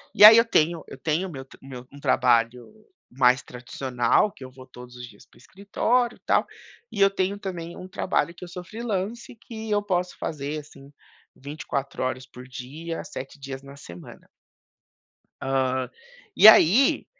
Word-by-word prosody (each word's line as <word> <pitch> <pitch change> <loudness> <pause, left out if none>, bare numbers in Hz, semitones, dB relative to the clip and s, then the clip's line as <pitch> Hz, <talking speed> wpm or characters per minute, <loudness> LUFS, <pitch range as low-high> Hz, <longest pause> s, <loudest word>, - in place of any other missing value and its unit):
e 210 - +9
aí 220 +1 +12
eu 230 - +5
tenho 165 -5 +1
eu - - -10
tenho 160 +7 -1
o - - -9
meu 135 -2 -8
t - - -18
o - - -16
meu 125 -1 -10
um 140 - -12
trabalho 120 - +1 0.4
mais 125 +1 +3
tradicional 125 +7 -1
que - - -13
eu 130 - -10
vou 130 0 -14
todos 125 -1 -13
os 125 - -8
dias 105 -3 -18
para - - -25
o - - -20
escritório 225 - -1
e - - -36
tal, - - +2 0.5
e - - -6
eu 195 0 +6
tenho, 195 +1 -2
também, 175 -4 -7
um 185 - -9
trabalho 185 -2 -1
que - - -12
eu 180 0 -8
freelancer 220 +1 -5
que 220 -2 -8
eu 205 0 +2
posso 180 -3 -2
fazer, 150 0 -4
assim, 140 -1 -15 0.4
24 140 -1 -5
horas 130 0 -3
por 125 -1 -13
dia, 150 +7 -7
7 135 +2 -9
dias 135 0 -8
na 140 0 -13
semana. 85 -10 -13 1.1
Hã, 130 -1 -1 0.5
e 215 - +8
aí, 220 - +6
145 Hz, 180 wpm, -24 LUFS, 130-190 Hz, 1.1 s, aí